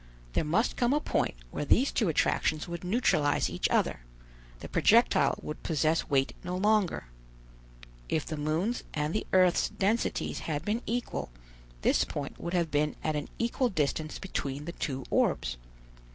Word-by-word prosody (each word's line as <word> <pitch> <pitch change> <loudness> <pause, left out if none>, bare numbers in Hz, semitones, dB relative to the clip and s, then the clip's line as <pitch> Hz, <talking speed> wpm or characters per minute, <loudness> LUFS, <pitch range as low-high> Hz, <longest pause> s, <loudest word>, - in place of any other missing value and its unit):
There - - +1
must 175 +10 +1
come 245 +2 +2
a 295 - +3
point 300 - 0 0.2
where - - -3
these 255 - +3
two 215 -7 +1
attractions 155 0 +1
would 170 0 -6
neutralize 180 -7 +2
each - - 0
other: - - +1 0.6
the - - -7
projectile 235 +3 +4
would 150 - -6
possess 160 0 +1
weight 135 -2 +2
no 180 0 -3
longer. 205 - +2 1.0
If 155 - 0
the 155 - -4
moon's 160 +10 -1
and 150 +1 -1
the 215 - -2
earth's 185 -2 +4
densities 215 +4 0
had 150 +1 -2
been 220 +3 0
equal, 240 - -2 0.5
this - - +4
point 140 -2 -5
would 170 +1 -3
have 170 -3 +1
been 150 +1 +1
at 155 - 0
an 150 - -3
equal 235 +2 +1
distance 155 - -1
between 145 -6 -4
the 170 - -4
two 135 -5 -4
orbs. - - +1
165 Hz, 160 wpm, -29 LUFS, 150-210 Hz, 1.0 s, projectile